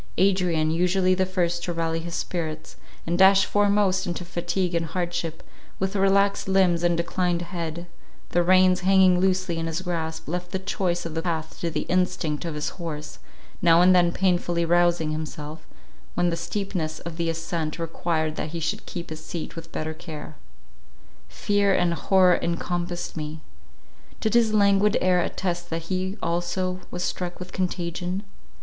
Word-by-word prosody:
Adrian, 180 -4 +2
usually 180 +2 +2
the 185 0 +1
first 175 -2 0
to 175 - -2
rally 165 -1 -1
his 170 +1 -5
spirits, 160 -3 -4 0.3
and 175 +2 -1
dash 195 +1 +7
foremost 200 -2 +2
into 175 0 -4
fatigue 180 +1 -2
and 165 -1 0
hardship, 175 -1 -3 0.3
with 190 +2 -2
relaxed 200 0 +3
limbs 185 -3 +3
and 175 -1 +2
declined 175 0 0
head, 170 -1 -5 0.4
the 175 - +2
reins 185 +1 +5
hanging 185 -1 +5
loosely 185 -2 +1
in 165 - -2
his 165 +3 -3
grasp, 160 -3 -3
left 175 +2 -3
the 190 - -2
choice 185 -2 -1
of 165 - -4
the 165 - -1
path 160 -2 -3
to 170 - 0
the 160 - -2
instinct 175 -3 0
of 165 -2 -3
his 150 +1 -2
horse, 150 -3 -6 0.4
now 170 -1 +6
and 180 +1 +6
then 175 -1 +4
painfully 175 -2 +1
rousing 175 -2 +3
himself, 155 0 -6 0.5
when 175 -1 +2
the - - 0
steepness 170 -2 -3
of 170 -1 -7
the 170 -1 0
ascent 165 -1 -3
required 165 -1 -2
that 150 - -3
he 170 - -3
should 165 +7 -3
keep 170 -3 -6
his 155 0 -7
seat 165 0 -6
with 165 0 -9
better 155 0 -3
care. 155 -1 -9 0.9
Fear 200 - +1
and 175 -1 +2
horror 185 +1 +4
encompassed 175 +1 -3
me. 155 0 -5 0.8
Did 220 - 0
his 235 -2 +4
languid 200 0 +4
air 180 -1 +3
attest 175 -1 -3
that 165 +2 -4
he 185 +2 -2
also 175 +2 -1
was 180 0 -4
struck 175 0 -3
with 180 0 -8
contagion? 180 +1 -2
175 Hz, 165 wpm, -25 LUFS, 165-185 Hz, 0.9 s, dash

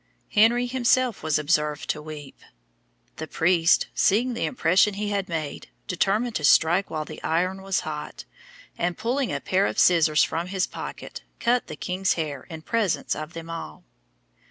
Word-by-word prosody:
Henry 235 +3 +4
himself 250 -1 +1
was 155 -1 +1
observed 150 -1 0
to 150 - -6
weep. 150 -2 -10 0.8
The - - -5
priest, 165 0 +3
seeing 240 +6 +2
the 235 - -2
impression 195 -3 +2
he 205 +1 -2
had 200 -2 -2
made, 155 -3 -4 0.2
determined 210 +6 0
to 150 - -7
strike 170 +6 +4
while 155 -1 -3
the 155 - -10
iron 185 +4 -1
was 195 -1 -1
hot, 150 -1 -7 0.5
and 175 0 -1
pulling 245 +4 -1
a - - -2
pair 190 +2 +1
of - - -4
scissors 160 -4 +4
from 170 +2 -2
his 185 0 0
pocket, - - -8 0.2
cut 245 +1 +1
the 155 - -7
king's 185 +4 -1
hair 150 -5 -4
in 160 -1 -8
presence 220 -4 0
of 155 +2 -7
them 165 0 -8
all. 75 - -7
180 Hz, 165 wpm, -25 LUFS, 155-210 Hz, 0.8 s, Henry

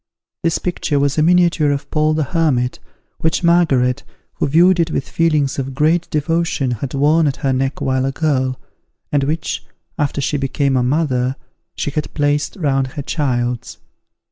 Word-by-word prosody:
This 165 -1 +1
picture 170 -4 -2
was 140 +2 +1
a - - +4
miniature 170 -2 +3
of 140 0 -2
Paul 155 0 +2
the 155 - +1
Hermit, 140 -5 0 0.4
which 160 +2 0
Margaret, 150 -8 +3 0.4
who - - 0
viewed 175 +5 +4
it 165 -1 +2
with 140 - -2
feelings 150 -5 +1
of 135 0 -4
great 160 +4 +2
devotion, 155 -3 0
had 125 +4 -4
worn 150 +3 +3
at 140 - 0
her 135 - +2
neck 135 +1 -1
while 130 0 +1
a - - -1
girl, 130 -4 0 0.5
and 145 -1 +2
which, 155 +3 -2 0.4
after 145 -1 0
she 145 +2 0
became 135 0 0
a 125 - +2
mother, 130 -1 0 0.4
she 145 - -2
had 150 +1 -3
placed 145 0 0
round 135 -7 0
her 145 - -5
child's. 125 -5 -2
145 Hz, 170 wpm, -18 LUFS, 135-160 Hz, 0.5 s, a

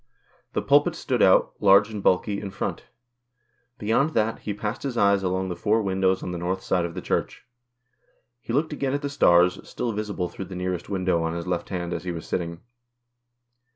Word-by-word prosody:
The - - -1
pulpit - - +4
stood - - -1
out, - - +5
large 100 +2 +5
and 105 -2 -5
bulky, 100 +2 +1
in 100 - -5
front. - - -4 0.9
Beyond 115 +9 +1
that, 110 0 +1
he 105 - -4
passed 105 +3 -4
his 135 -4 -4
eyes 100 -2 +4
along 95 0 -1
the 90 - -3
four 105 +5 +1
windows 95 -1 +1
on - - -4
the 90 - -4
north 95 +2 -2
side 90 -2 +1
of 85 0 -6
the 90 - -5
Church. - - -2 0.9
He 120 - -7
looked 150 +5 0
again 140 -2 -2
at 145 - -3
the 140 - -1
stars, 90 -9 +4
still 120 - -2
visible 105 -4 -3
through 95 - -7
the 95 - -9
nearest 90 -1 -3
window 95 -3 0
on 80 0 -2
his 85 -1 -4
left 90 -1 -2
hand 90 -2 -3
as 85 - -4
he 90 - -3
was 85 -1 -6
sitting. 85 -1 -3
95 Hz, 200 wpm, -25 LUFS, 90-105 Hz, 0.9 s, out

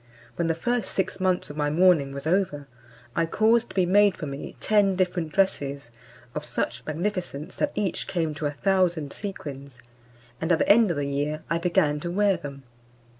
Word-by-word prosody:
When 170 - 0
the 165 - +1
first 240 +5 -1
six 190 0 -1
months 185 -4 0
of 145 - -10
my 145 -1 +1
mourning 160 -3 +4
was 140 +1 -7
over, 160 -4 0 0.5
I 165 -1 +1
caused 225 +6 +3
to - - -12
be 185 -2 +3
made 205 +2 +4
for 160 - -5
me 140 0 -7
ten 205 -3 +3
different 180 -3 -1
dresses, 140 -9 0 0.4
of - - -4
such - - -2
magnificence 175 -1 -3
that 295 - 0
each 200 -4 -1
came 165 -5 -1
to 150 0 -2
a - - -2
thousand 175 -2 +1
sequins; 140 -10 -7 0.6
and 160 +2 0
at 165 - +5
the - - 0
end 220 0 +6
of 170 - -1
the 145 - -1
year 145 +2 -2
I 165 - +2
began 170 -4 +2
to 175 - -4
wear 200 +2 +2
them. 140 -3 -8
170 Hz, 190 wpm, -26 LUFS, 145-195 Hz, 0.6 s, end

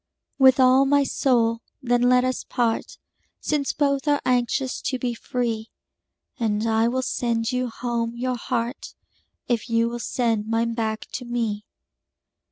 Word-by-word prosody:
With 265 0 +6
all 260 +1 +6
my 285 0 +4
soul, 235 -4 +1 0.2
then, 245 -3 +1
let 250 0 +4
us 255 0 -1
part, 235 -3 -1 0.4
Since 295 -2 -1
both 280 -1 0
are 290 -1 +3
anxious 250 +1 0
to 260 - -2
be 250 -1 -2
free; 230 -2 -3 0.7
And 215 -2 0
I 225 0 +2
will 260 +2 -1
sand 230 -3 -1
you 250 0 -1
home 235 0 -3
your 255 +1 -1
heart, 240 +1 -4 0.5
If 240 0 -1
you 230 0 +2
will 240 0 -5
send 230 -3 -1
mine 230 +1 0
back 220 -1 -2
to 250 - -4
me. 225 -3 -2
240 Hz, 150 wpm, -24 LUFS, 230-255 Hz, 0.7 s, With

